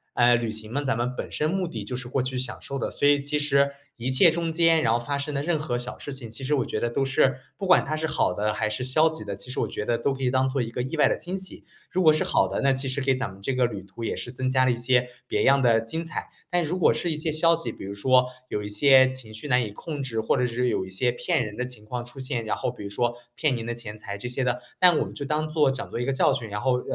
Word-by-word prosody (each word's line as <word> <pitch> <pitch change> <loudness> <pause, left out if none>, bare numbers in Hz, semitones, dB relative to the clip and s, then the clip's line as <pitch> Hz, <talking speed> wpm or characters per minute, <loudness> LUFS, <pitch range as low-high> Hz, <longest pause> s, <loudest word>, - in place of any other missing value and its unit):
呃， 120 0 +5
旅 115 -1 -1
行 110 +1 -6
呢， 145 +1 -1
咱 130 -4 0
们 125 +1 -1
本 - - -5
身 155 +1 0
目 190 +1 0
的 110 -9 -6
就 125 - -4
是 125 -1 -6
过 130 - 0
去 130 0 -3
享 125 -1 -2
受 135 - -5
的， - - -2
所 145 - +2
以 145 -1 +4
其 145 +1 -1
实 140 -1 +3 0.2
一 125 +2 -2
切 160 +6 +6
中 165 0 -1
间 165 -1 +4
然 115 - +3
后 120 - +2
发 140 +4 -2
生 145 +1 -4
的 140 - -1
任 160 +1 0
何 150 -5 -2
小 125 +1 -5
事 145 - -7
情， 130 -4 -7
其 115 +4 -8
实 140 - 0
我 130 - 0
觉 - - -3
得 120 - +1
都 135 +3 0
是 135 -1 +2 0.2
不 200 - -4
管 180 - +5
它 155 +2 -2
是 160 +1 -2
好 155 - +1
的 105 +3 0
还 110 -2 -1
是 115 +4 -3
消 155 +5 +3
极 160 -8 -7
的， 100 -1 -5
其 125 - -10
实 130 - -2
我 - - 0
觉 105 - -4
得 120 -1 +1
都 140 - 0
可 135 - -8
以 125 - +3
当 130 +1 +2
作 135 -1 -1
一 115 -1 -3
个 125 - -3
意 145 +5 -4
外 - - +5
的 - - +1
惊 180 +3 -5
喜。 190 0 -8 0.3
如 185 - 0
果 155 - +8
是 155 - +1
好 - - +2
的， - - -2
那 135 -1 +3
其 130 +1 -2
实 130 +2 -2
给 135 0 +2
咱 125 -6 -3
们 95 - -14
这 135 +7 -1
个 125 - +3
旅 105 -5 -4
途 110 +4 -10
也 - - -1
是 - - -6
增 130 0 -1
加 130 0 +3
了 130 - +3
一 - - 0
些 125 +1 +2 0.2
别 - - 0
样 140 0 +5
的 115 -2 +4
精 115 +9 -4
彩。 165 +2 -5 0.2
但 175 0 +2
如 165 +4 -2
果 - - +5
是 175 - -1
一 - - -1
些 155 +1 -2
消 165 +2 +3
极， 165 - -4
比 - - -9
如 100 - -5
说 125 +5 +4 0.2
有 105 - -2
一 105 - -5
些 130 +4 +6
情 120 -5 -9
绪 110 +7 -7
难 125 -1 +3
以 105 - -7
控 145 +6 -6
制， 115 -4 -2
或 110 - +1
者 125 - +2
是 125 +1 -1
有 95 - 0
一 - - -10
些 120 +6 +1
骗 120 -1 0
人 105 0 -7
的 125 - -2
情 120 -4 -11
况 120 +2 -4
出 120 +2 -11
现， 125 -3 -3
然 110 - -2
后 120 - -1
比 125 - -10
如 100 - -5
说 120 +3 0 0.2
骗 150 -5 +1
您 115 - -5
的 120 - -2
钱 110 -2 -7
财 100 -1 -6
这 110 - -6
些 125 +2 -2
的， 125 0 0 0.2
那 180 - +9
我 - - +1
们 - - -9
就 145 - -5
当 155 +2 -1
作 150 -3 +3
讲 135 - -5
作 - - -5
一 120 - -1
个 135 - 0
教 135 - +3
训， 115 -3 -4
然 105 +1 -3
后 125 0 +1
130 Hz, 350 characters per minute, -25 LUFS, 120-145 Hz, 0.3 s, 那